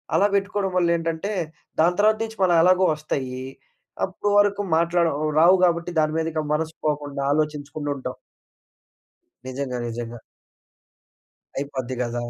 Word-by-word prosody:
అలా 200 - +5
పెట్టుకోవడం 200 -1 0
వల్ల 175 -1 +3
ఏంటంటే, 165 +5 -3 0.5
దాని 175 +2 +3
తర్వాత 215 +1 +4
నుంచి 220 0 -7
మన 185 - +4
ఎలాగో 185 +1 +5
వస్తాయి. 130 -4 -4 0.6
అప్పటి 195 +2 -3
వరకు 205 0 +2 0.2
మాట్లాడడం 165 -3 +1
రావు 175 +4 +7
కాబట్టి 170 0 0
దాని 155 0 +2
మీదిక 160 -1 -1
మనసు 160 +1 -2
పోకుండా 145 -2 -2
ఆలోచించకుండా 150 -1 -2
ఉంటాం. 130 - -6 1.3
నిజంగా. 130 -1 -4
నిజంగా. 115 0 -6 1.4
అయిపోద్ది 130 -2 -4
కదా! 120 0 -3
160 Hz, 120 wpm, -23 LUFS, 140-180 Hz, 1.4 s, రావు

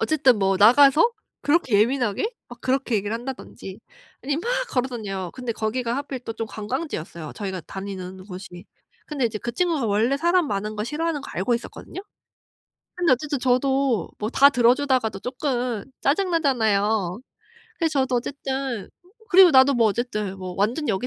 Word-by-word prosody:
어쨌든 270 -7 +3
뭐 195 -1 +2
나가서 275 - +6 0.3
그렇게 290 -9 +3
예민하게 245 - 0 0.2
막 240 - -12
그렇게 260 -2 0
얘기를 205 +1 -1
한다든지 235 -5 -7 0.4
아니면 290 +3 -1
막 480 - -2 0.2
걸어 255 0 0
다녀요. 195 -7 -5
근데 250 -2 -4
거기가 230 +2 -2
하필 275 -2 -4
또 230 - -6
좀 225 0 -4
관광지였어요 210 - -5
저희가 190 -3 -4
다니는 190 -1 -7
곳이. 180 -1 -9 0.4
근데 285 -5 -2
이제 215 -2 -4
그 240 +3 -5
친구가 320 -3 0
원래 220 +7 +2
사람 345 +2 +2
많은 210 +1 -3
거 210 - -2
싫어하는 305 +4 -2
거 - - -10
알고 215 +7 0
있었거든요. 240 +9 -7 0.9
근데 350 -6 +2
어쨌든 285 +2 -1
저도 255 -4 +1
뭐 215 +2 -3
다 280 +2 +6
들어 245 -3 +4
주다가도 255 -8 0
조금 250 -4 -2 0.2
짜증 360 +7 +1
나잖아요. 220 - +1 0.6
그래서 315 -5 +1
저도 260 -1 +1
어쨌든 265 -3 -3 0.4
그리고 375 -1 +8
나도 265 -1 +6
뭐 230 -2 +4
어쨌든 210 -3 -3
뭐 185 -1 -6
완전 235 +10 0
여기 210 +3 0
245 Hz, 370 characters per minute, -23 LUFS, 210-275 Hz, 0.9 s, 그리고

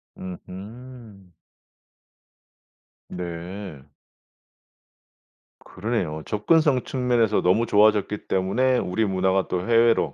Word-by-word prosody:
으흠. 100 +2 -11 1.8
네. 90 -2 -7 1.8
그러네요. 95 -9 -3
접근성 135 +5 +2
측면에서 120 -4 +1
너무 95 +6 +2
좋아졌기 105 -1 +2
때문에 125 +8 +1
우리 110 +1 -1
문화가 95 -1 0
또 90 - -2
해외로 115 0 +3
105 Hz, 190 characters per minute, -24 LUFS, 95-120 Hz, 1.8 s, 해외로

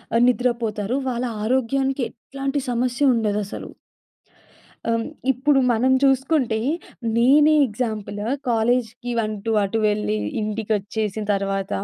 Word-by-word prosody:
ఆహ్, 235 - +4
నిద్రపోతారు. 235 -2 0
వాళ్ళ 245 0 -2 0.2
ఆరోగ్యానికి 265 +2 0
ఎట్లాంటి 275 +4 -4
సమస్య 250 +3 +2
ఉండదసలు. 210 -3 -2 1.2
ఆహ్, - - +3
హ్మ్, 225 - -2 0.3
ఇప్పుడు 270 +2 +2
మనం 245 +3 +2
చూసుకుంటే 265 -4 +2 0.6
నేనే 295 +6 +5
ఎగ్జాంపుల్. 215 -2 -4 0.3
కాలేజికి 240 +1 0
అంటూ 215 +1 -3
అటు 220 +3 -1
వెళ్ళి, 210 - 0 0.3
ఇంటికొచ్చేసిన 215 0 -2
తరువాత 195 0 -2
235 Hz, 100 wpm, -22 LUFS, 215-260 Hz, 1.2 s, నేనే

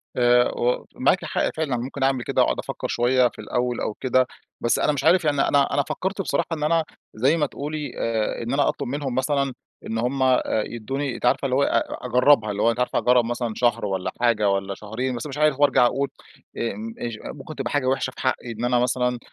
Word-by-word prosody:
آآ، 120 0 +4 0.4
ومعاكِ - - +2
حق - - 0
فعلًا، 150 -6 -1
ممكن 130 +3 -4
أعمل 135 -2 +1
كده - - +1
وأقعد - - +1
أفكّر - - -4
شويّة 125 +1 +3
في - - -11
الأوّل 125 -1 -2
أو 105 - -2
كده. 130 +1 +1 0.3
بس 120 - +2
أنا - - +2
مش 145 - -3
عارف 180 -2 +4
يعني 145 -2 +2
أنا 140 -1 +2
أنا 145 - +2
فكرت 195 +2 -2
بصراحة 170 -3 -1
إن 155 -2 -3
أنا- 165 +2 +2 0.3
زي 135 +9 +3
ما 150 - +2
تقولي- 145 0 -5
آآ، 110 -2 -1
إن 120 - -3
أنا 140 0 +2
أطلب - - -3
منهم 135 -1 -3
مثلًا، 140 0 0 0.3
إن 115 - -3
هم 130 +3 0
آآ 130 -1 +3 0.2
يدوني، 130 +4 -4
أنتِ - - -5
عارفة 125 - +2
اللي 130 -1 +1
هوّ 140 - +3
أ - - +2
أ - - -3
أجربها 125 -2 +4
اللي 100 0 -3
هوّ 115 - +4
أنتِ 115 - -5
عارفة 125 - +1
أجرّب 125 -1 +3
مثلًا 120 -1 -2
شهر 120 -3 +1
والّا 95 -2 -2
حاجة 110 -4 +3
والّا 100 0 -1
شهرين 120 +6 -4
بس 120 +5 -5
مش 140 0 -7
عارف. 150 -2 +2
و - - +4
أرجع 125 -3 +4
أقول 140 +3 0 0.5
إمم 115 0 -4
إچ 115 -2 -4 0.2
ممكن 145 +2 -9
تبقى 135 -4 -3
حاجة 145 -3 0
وحشة 130 0 0
في - - -10
حقي 130 -2 -1
إن 115 +1 -3
أنا 125 0 +2
مثلًا، 125 0 0
125 Hz, 225 wpm, -23 LUFS, 120-140 Hz, 0.5 s, آآ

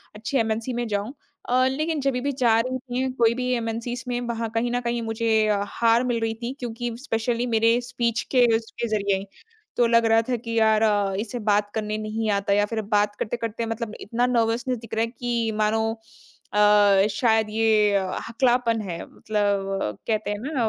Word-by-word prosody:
अच्छी 225 +6 -2
एमएनसी 225 +2 -1
में 240 -1 -2
जाऊँ। 205 +4 -2 0.4
अ, 255 +1 +3
लेकिन 310 +2 -1
जब 275 -1 +1
भी 285 - +1
जा 235 -4 +3
रही 255 +2 -1
थी 255 +1 -3
कोई 230 0 +5
भी 255 0 -2
एमएनसीज़ 235 +2 -3
में, 245 -1 -1
वहाँ 230 -1 -3
कहीं 240 +1 0
न 245 - 0
कहीं 235 0 -1
मुझे 225 -1 +1
अ, 205 -1 +1
हार 230 +3 +2
मिल 240 -2 0
रही 225 0 0
थी, 245 +3 -3
क्योंकि 240 -1 -4
स्पेशली 235 -2 -1
मेरे 230 +2 +4
स्पीच 240 -2 -1
के 245 -1 +6
उसके 225 +1 -4
ज़रिए। 200 -1 -1 0.5
तो 240 - +4
लग 230 0 +4
रहा 225 0 +4
था 245 - +2
कि 230 0 -2
यार 220 0 +4
अ, 205 -3 +2
इसे 235 +3 -4
बात 205 0 +2
करने 215 -1 -2
नहीं 215 +1 -3
आता 200 0 +1
या 205 +1 +3
फिर 220 - 0 0.2
बात 205 0 +1
करते-करते 230 0 -3
मतलब 225 -1 -4
इतना 235 +4 0
नर्वसनेस 240 +1 0
दिख 230 -1 -12
रहा 225 - +1
है - - -6
कि 235 -2 -2
मानो 220 +1 +1 0.6
अ, 205 -1 +5
शायद 220 0 +2
ये 215 -1 +3
अ, 190 -1 -1
हकलापन 235 -1 +1
है। 175 -4 -5
मतलब 195 - -2
कहते 215 -2 -1
हैं 205 - -3
ना 255 -5 +1
225 Hz, 190 wpm, -24 LUFS, 215-240 Hz, 0.6 s, के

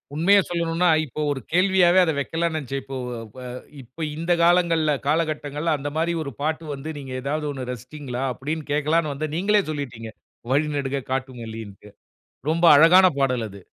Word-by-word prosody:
உண்மைய 190 +6 +5
சொல்லணும்ன்னா, 170 0 +1 0.2
இப்போ 150 +2 -6
ஒரு 140 - -2
கேள்வியாவே 185 0 +4
அத 160 - +1
வக்கலானு 165 +4 -1
நினைச்சேன். 135 -2 -4
இப்போ 135 0 -6 0.4
ப - - -10 0.4
இப்ப 130 +6 -6
இந்த 165 +2 -2
காலங்கள்ல 170 -3 +3 0.2
காலகட்டங்கள்ல 155 0 0
அந்த 145 +1 -4
மாரி 170 +1 +1
ஒரு 140 - -6
பாட்டு 155 +2 -1
வந்து, 140 +3 -7
நீங்க 135 -2 -8
ஏதாவது 150 +2 -2
ஒண்ணு 130 -3 -6
ரசிச்சீங்களா 125 +1 -6
அப்டின்னு 150 +4 -5
கேட்கலான்னு 155 +1 +1
வந்தேன். 150 +2 -4
நீங்களே 205 +2 +3
சொல்லிட்டீங்க. 120 -7 -6 0.4
"வழி 150 +3 +2
நெடுக 140 -1 -2
காட்டுமல்லின்ட்டு." 115 -6 -6 0.6
ரொம்ப 170 +2 +2
அழகான 170 +6 +7
பாடல் 125 -4 +1
அது. 100 0 -12
150 Hz, 155 wpm, -23 LUFS, 135-165 Hz, 0.6 s, அழகான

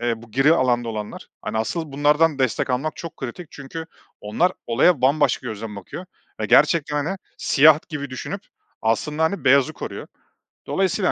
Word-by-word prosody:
eee, 115 -1 -2
bu 115 - -15
gri 135 +7 +4
alanda 120 -4 +1
olanlar, 105 -2 -6
hani, 110 - -3
asıl 155 +6 -3
bunlardan 150 +1 +3
destek 130 +1 0
almak 140 +5 -1
çok 165 - -8
kritik. 135 +7 -7
Çünkü 160 +4 -8 0.3
onlar 165 +13 +1
olaya 125 +4 +3
bambaşka 135 -1 +2
gözden 110 -1 -6
bakıyor 170 - -8 0.3
ve - - -1
gerçekten, 150 -4 +3
hani, 190 +5 -2 0.2
siyah 150 +2 +6
gibi 145 -4 -5
düşünüp 190 +9 -5 0.4
aslında, 150 +8 0
hani, 200 +5 -1
beyazı 135 0 +4
koruyor. - - -7 0.6
Dolayısıyla, 190 0 +1
140 Hz, 155 wpm, -22 LUFS, 120-160 Hz, 0.6 s, siyah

